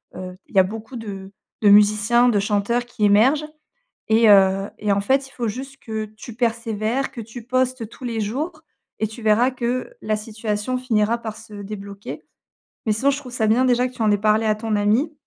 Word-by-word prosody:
heu, 185 Hz, 0 st, -7 dB
il -, -, -18 dB
y -, -, +7 dB
a -, -, +7 dB
beaucoup 220 Hz, +6 st, -7 dB
de 195 Hz, -4 st, -7 dB, 0.3 s
de 210 Hz, -, +5 dB
musiciens, 210 Hz, +4 st, +5 dB
de 220 Hz, -, +2 dB
chanteurs 210 Hz, +4 st, 0 dB
qui 240 Hz, -2 st, -5 dB
émergent 255 Hz, +10 st, +4 dB, 0.6 s
et 225 Hz, 0 st, +5 dB
heu, 195 Hz, 0 st, +5 dB
et 210 Hz, -1 st, 0 dB
en 200 Hz, -, +2 dB
fait, 265 Hz, +7 st, +1 dB
il -, -, -21 dB
faut 240 Hz, -4 st, -3 dB
juste 270 Hz, +5 st, -7 dB
que 220 Hz, -1 st, -4 dB
tu 235 Hz, -, -9 dB
persévères, 230 Hz, +1 st, -1 dB
que 235 Hz, -, -7 dB
tu 225 Hz, +2 st, -10 dB
postes 255 Hz, -2 st, 0 dB
tous 255 Hz, -, -13 dB
les 230 Hz, -2 st, -2 dB
jours 300 Hz, +10 st, -3 dB, 0.4 s
et 215 Hz, -, +2 dB
tu 220 Hz, +2 st, -10 dB
verras 220 Hz, +4 st, +4 dB
que 250 Hz, -, -3 dB
la 215 Hz, -, 0 dB
situation 215 Hz, +2 st, -3 dB
finira 230 Hz, -3 st, +1 dB
par 220 Hz, -2 st, -6 dB
se 220 Hz, -1 st, -13 dB
débloquer 200 Hz, 0 st, -8 dB, 0.6 s
mais 215 Hz, -, +2 dB
sinon, 265 Hz, +7 st, +2 dB
je 280 Hz, -, -2 dB
trouve 270 Hz, -4 st, -9 dB
ça 225 Hz, -3 st, 0 dB
bien 230 Hz, +4 st, +3 dB
déjà 250 Hz, 0 st, +3 dB
que 255 Hz, -, -12 dB
tu 245 Hz, -, -8 dB
en 215 Hz, -, +3 dB
aies 205 Hz, -, +3 dB
parlé 215 Hz, +2 st, +2 dB
à 215 Hz, -1 st, +2 dB
ton 215 Hz, 0 st, -2 dB
ami. 220 Hz, +10 st, +1 dB
220 Hz, 210 wpm, -22 LUFS, 210-245 Hz, 0.6 s, y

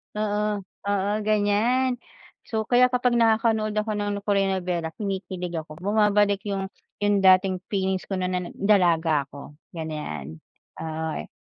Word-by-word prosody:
Oo, 210 Hz, -1 st, -1 dB, 0.2 s
oo, 200 Hz, -1 st, 0 dB, 0.2 s
ganyan. 225 Hz, +5 st, +2 dB, 0.5 s
So, 220 Hz, -1 st, -1 dB
kaya 250 Hz, +1 st, +5 dB
kapag 250 Hz, -1 st, +1 dB
nakakanood 220 Hz, -1 st, +2 dB
ako 215 Hz, +1 st, 0 dB
ng 205 Hz, -1 st, -2 dB
Korean 200 Hz, -2 st, +2 dB
nobela, 175 Hz, -3 st, -2 dB
kinikilig 185 Hz, -3 st, -4 dB
ako. 155 Hz, -1 st, -10 dB
Bumabalik 205 Hz, 0 st, +3 dB
yung 195 Hz, -1 st, -3 dB, 0.3 s
yung 205 Hz, -1 st, +3 dB
dating 185 Hz, 0 st, +4 dB
feelings 190 Hz, -2 st, -1 dB
ko 195 Hz, -, -2 dB
no'n 185 Hz, 0 st, -1 dB
na 180 Hz, -, 0 dB, 0.2 s
dalaga 170 Hz, -7 st, +3 dB
ako, 140 Hz, +1 st, -11 dB, 0.2 s
ganyan. 80 Hz, -, -5 dB, 0.4 s
Oo 160 Hz, 0 st, -3 dB
eh. -, -, -8 dB
200 Hz, 135 wpm, -25 LUFS, 180-210 Hz, 0.5 s, kaya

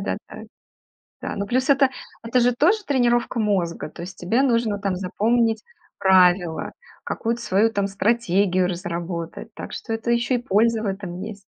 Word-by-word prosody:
да, -, -, -2 dB
да. -, -, -9 dB, 0.8 s
Да. -, -, -3 dB
Ну, 200 Hz, -, -2 dB
плюс 255 Hz, +2 st, 0 dB
это 275 Hz, -1 st, +5 dB, 0.3 s
это 235 Hz, +2 st, +1 dB
же 245 Hz, 0 st, +3 dB
тоже 370 Hz, -, +2 dB
тренировка 240 Hz, -3 st, +1 dB
мозга, 190 Hz, -7 st, -1 dB
то 160 Hz, -, -11 dB
есть 185 Hz, +2 st, -8 dB
тебе 220 Hz, +9 st, +1 dB
нужно 230 Hz, -5 st, +1 dB
там 195 Hz, -2 st, -2 dB
запомнить 220 Hz, +5 st, +1 dB, 0.3 s
правила, 180 Hz, -3 st, +3 dB, 0.3 s
какую-то 235 Hz, +1 st, -2 dB
свою 215 Hz, +1 st, +2 dB
там 200 Hz, -1 st, 0 dB
стратегию 195 Hz, -3 st, +1 dB
разработать, 170 Hz, 0 st, -5 dB
так -, -, -8 dB
что 225 Hz, -, -5 dB
это 225 Hz, +2 st, -2 dB
еще 235 Hz, +2 st, +1 dB
и -, -, +2 dB
польза 225 Hz, 0 st, +1 dB
в -, -, -3 dB
этом 190 Hz, -3 st, -4 dB
есть. 205 Hz, 0 st, -7 dB
210 Hz, 165 wpm, -23 LUFS, 185-235 Hz, 0.8 s, это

